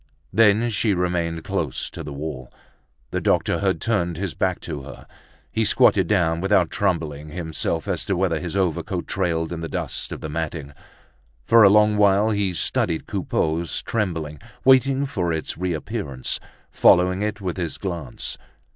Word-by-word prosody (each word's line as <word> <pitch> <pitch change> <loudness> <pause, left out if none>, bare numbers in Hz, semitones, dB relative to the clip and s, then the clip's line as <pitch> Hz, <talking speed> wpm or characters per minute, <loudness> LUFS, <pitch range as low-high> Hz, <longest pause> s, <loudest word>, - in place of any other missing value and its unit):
Then 115 +2 +4
she 105 0 +1
remained 85 -2 -1
close - - -2
to - - -7
the 75 - -7
wall. 70 -3 -6 0.6
The - - -1
doctor - - +1
had 95 -2 0
turned 90 -7 0
his 95 -2 -3
back - - 0
to 70 - -5
her. 65 - -11 0.5
He 110 - +1
squatted 105 -5 +4
down, 85 -4 +2
without 95 -3 +2
troubling 75 -2 -1
himself 80 0 -3
as - - -1
to 95 -3 0
whether 90 -4 +1
his 90 +1 -5
overcoat 90 -1 -1
trailed 85 -3 -1
in 85 - -5
the 80 - -5
dust - - -3
of - - -6
the - - -4
matting; 75 -2 -4 0.7
for 115 0 +6
a 100 - +9
long 105 +1 +4
while 105 +1 +4
he 100 -3 0
studied 80 0 0
Coupeau's 80 0 -1
trembling, 80 -9 -2 0.3
waiting 135 +1 +5
for 90 -11 -1
its 80 -1 -3
reappearance, 85 - -3 0.3
following 90 +2 +4
it 105 0 -2
with 95 -3 -4
his 85 -4 -3
glance. 85 -10 -5
90 Hz, 160 wpm, -23 LUFS, 80-100 Hz, 0.7 s, a